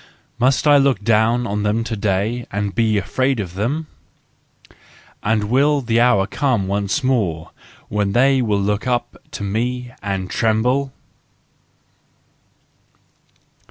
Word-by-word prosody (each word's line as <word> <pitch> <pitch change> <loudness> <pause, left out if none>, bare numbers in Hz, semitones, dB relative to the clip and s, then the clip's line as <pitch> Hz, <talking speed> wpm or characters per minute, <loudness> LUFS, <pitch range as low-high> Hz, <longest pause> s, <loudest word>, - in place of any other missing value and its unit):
Must 130 +4 +2
I 145 -1 +6
look 135 -7 +2
down 115 +2 +2
on 105 -1 -2
them 105 +2 0
to 115 0 -4
day, 105 +4 -1
and 100 0 -2
be 110 -2 +1
afraid 130 +7 0
of 90 -4 -5
them? 125 +12 -2 1.4
And 110 0 +1
will 140 +6 +2
the 115 -1 +1
hour 120 -6 +4
come 120 -4 -1
once 100 +6 -1
more 100 -12 -1 0.4
when 100 -1 -1
they 135 +2 +4
will 105 -4 0
look 105 +3 -1
up 120 -1 -1 0.2
to - - -6
me, 120 +5 -2
and 95 -2 -3
tremble 125 +7 0
115 Hz, 125 wpm, -19 LUFS, 100-125 Hz, 1.4 s, I